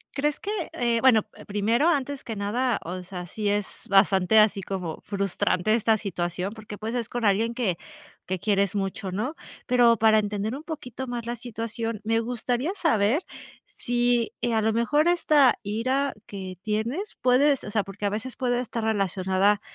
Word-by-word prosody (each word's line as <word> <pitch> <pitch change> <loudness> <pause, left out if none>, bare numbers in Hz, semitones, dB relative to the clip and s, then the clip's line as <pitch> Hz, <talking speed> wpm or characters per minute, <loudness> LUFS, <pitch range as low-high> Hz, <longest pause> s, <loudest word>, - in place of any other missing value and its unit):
¿Crees 295 +1 -1
que?, 400 - -5 0.2
eh, 235 -1 +1
bueno, 230 -4 +5
p - - -16
primero, 215 +8 +1
antes 285 -4 0
que 225 - -4
nada, 225 +4 0
o 180 +2 -5
sea, 180 -1 -7
sí 210 +4 -4
es 205 -1 -3
bastante 195 +1 +4
así 210 -2 +4
como 180 -4 -4
frustrante 200 0 0
esta 225 0 +3
situación, 180 -1 -3
porque 215 -2 -9
pues, 220 +3 -4
es 235 -2 -1
con 240 0 -4
alguien 220 +3 +2
que 220 -8 -1 0.5
que 185 - -2
quieres 200 +1 +1
mucho, 195 -1 -3
¿no?, 235 - -2 0.3
pero, 245 -2 +5
para 220 0 +5
entender 210 +1 -2
un 290 - -8
poquito 265 -5 -6
más 240 -2 -4
la 240 +1 -3
situación, 230 -1 -4
me 225 +1 +1
gustaría 245 - -2
saber 260 - +2 0.5
si, 240 -1 0
eh, 240 - 0
a 220 - +2
lo 220 +1 +1
mejor 290 +8 +2
esta 305 -6 +4
ira 255 +7 0
que 190 -2 -7
tienes 230 - -2
puedes 270 +2 +4
o 210 - -6
sea, 210 -1 +1
porque 200 +1 -6
a - - +2
veces 220 +4 -4
puede 245 -2 0
estar 235 -2 -3
relacionada 195 -1 +1
220 Hz, 175 wpm, -26 LUFS, 200-245 Hz, 0.5 s, bueno